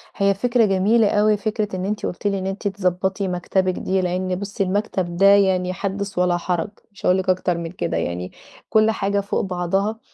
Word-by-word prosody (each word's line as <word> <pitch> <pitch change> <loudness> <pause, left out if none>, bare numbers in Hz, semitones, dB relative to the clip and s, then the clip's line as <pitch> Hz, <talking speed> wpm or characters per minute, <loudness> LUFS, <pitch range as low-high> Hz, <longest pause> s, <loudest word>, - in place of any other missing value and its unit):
هي 200 0 +3
فكرة 235 +3 +2
جميلة 205 +3 +3
أوي 210 0 +3
فكرة 210 -1 -2
إن 185 0 -3
أنتِ 210 +1 -2
قُلتِ 180 - -3
لي 200 -1 0
إن 190 - -3
أنتِ 195 +2 -3
تضبطي 190 0 -1
مكتبِك 185 +1 0
دي 190 +1 -1
لأن 185 0 -1
بُصّي 200 +2 -3
المكتب 185 -3 -2
ده 195 - +4
يعني 190 -2 +4
حدِّث 200 0 -4
ولا 180 -1 +2
حرج، 175 +1 -2 0.2
مش 200 - -10
هاقول 180 - +4
لِك 190 0 -2
أكتر 180 -1 +1
من 170 -1 -5
كده 85 - -2
يعني 90 +2 -3 0.4
كل 220 0 +4
حاجة 200 -1 0
فوق 200 +1 -1
بعضها 195 +4 -1
190 Hz, 195 wpm, -21 LUFS, 180-205 Hz, 0.4 s, ده